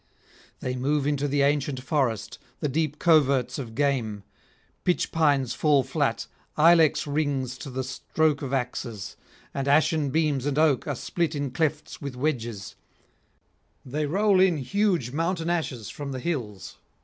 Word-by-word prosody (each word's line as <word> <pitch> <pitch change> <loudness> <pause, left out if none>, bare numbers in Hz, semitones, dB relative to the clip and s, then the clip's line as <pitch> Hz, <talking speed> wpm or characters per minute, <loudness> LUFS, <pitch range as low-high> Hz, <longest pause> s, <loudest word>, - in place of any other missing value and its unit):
They 125 0 -2
move 140 +3 0
into 145 0 0
the 140 0 +2
ancient 140 -1 +1
forest, 130 - -1 0.2
the - - -1
deep 150 +1 -1
coverts 145 -6 +3
of 115 -4 -7
game; 120 -7 0 0.6
pitch 180 - +1
pines 145 -6 +2
fall 145 -3 +3
flat, - - -1 0.3
ilex 165 -1 +5
rings 140 -4 -1
to 140 - -7
the 130 0 -3
stroke 145 +3 0
of 135 -2 -4
axes, 120 -5 -3 0.4
and 135 0 -3
ashen 150 0 +3
beams 145 -2 +1
and 145 -1 -1
oak 155 -5 +3
are 145 - -1
split 165 +4 -2
in 140 -2 -2
clefts 155 +2 -2
with 140 -3 -5
wedges; 120 -7 -3 1.1
they 145 +3 -2
roll 195 +4 +3
in 185 -3 +4
huge 175 - 0
mountain 165 +3 -1
ashes 135 - -3
from 140 -2 -6
the 130 - -4
hills. 120 - -4
145 Hz, 150 wpm, -26 LUFS, 130-155 Hz, 1.1 s, ilex